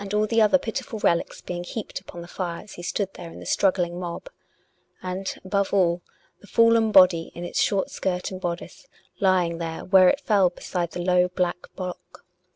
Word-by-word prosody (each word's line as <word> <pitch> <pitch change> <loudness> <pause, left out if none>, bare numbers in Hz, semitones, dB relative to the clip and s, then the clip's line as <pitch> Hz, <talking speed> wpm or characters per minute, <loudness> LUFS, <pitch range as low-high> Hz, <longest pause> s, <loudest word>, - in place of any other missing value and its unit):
all 210 0 +3
the 225 +1 +2
other 215 +6 +5
pitiful 235 -2 -5
relics 170 -5 0
being 175 -1 -5
heaped 215 +4 -6
upon 175 -2 -10
the - - -11
fire 175 -1 -5
as 210 - -13
he - - -9
stood 195 +2 -2
there 170 -1 -9
in - - -11
the - - -10
struggling 180 -3 +1
mob; 180 - -6 0.7
and, 185 +1 -4
above 200 +1 0
all, 175 -2 +2 0.4
the 205 - -17
fallen 230 0 +4
body, 185 -4 +5
in 170 - -6
its 175 - -1
short 200 -2 +1
skirt 180 -1 -2
and 185 0 -7
bodice 175 - -5 0.3
lying 180 -4 +2
there 165 -1 -5
where 185 -1 +6
it 285 - +1
fell 200 -8 +3
beside 175 -1 -4
the 170 - -7
low, 180 0 +3
black 180 -1 -2
block. 180 -1 -8
185 Hz, 190 wpm, -24 LUFS, 175-200 Hz, 0.7 s, where